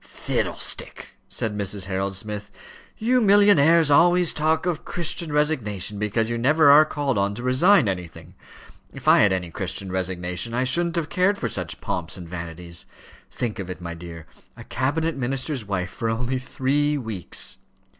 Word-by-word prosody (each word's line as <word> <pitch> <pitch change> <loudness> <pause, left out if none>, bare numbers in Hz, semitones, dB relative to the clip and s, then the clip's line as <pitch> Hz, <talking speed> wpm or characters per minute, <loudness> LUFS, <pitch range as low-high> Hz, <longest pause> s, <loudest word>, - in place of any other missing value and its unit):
"Fiddlestick!" - - -2 0.2
said 110 -2 -3
Mrs. 100 -1 -2
Harold 95 0 -3
Smith. 105 +1 -5 0.5
"You 250 +3 +2
millionnaires 170 -7 +5
always 175 +3 +4
talk 160 +2 0
of 175 -3 -2
Christian 170 -1 -2
resignation, 105 - 0
because 105 +2 0
you 120 0 -2
never 145 +4 +5
are 150 +2 +8
called 140 -7 -1
on 100 +1 0
to 120 - -7
resign 135 - +4
anything. 90 -3 -6 0.6
If - - -11
I - - +7
had 100 - +4
any 90 -2 -2
Christian 95 +2 -3
resignation, 90 +3 -2
I 125 - +1
shouldn't 170 +7 +1
have 165 -2 -2
cared 190 +4 +2
for 125 - -2
such - - -5
pomps 90 +1 -3
and 90 -2 -9
vanities. 85 0 -7 0.4
Think 115 -5 -4
of 95 -2 -5
it, 90 - -6
my 85 -1 -6
dear; 85 -1 -10 0.3
a - - -10
cabinet 160 +6 -1
minister's 135 -1 -2
wife 90 -2 -3
for 115 - -3
only 125 +3 -1
three 145 +3 0
weeks!" 110 - -3
115 Hz, 165 wpm, -23 LUFS, 95-150 Hz, 0.6 s, are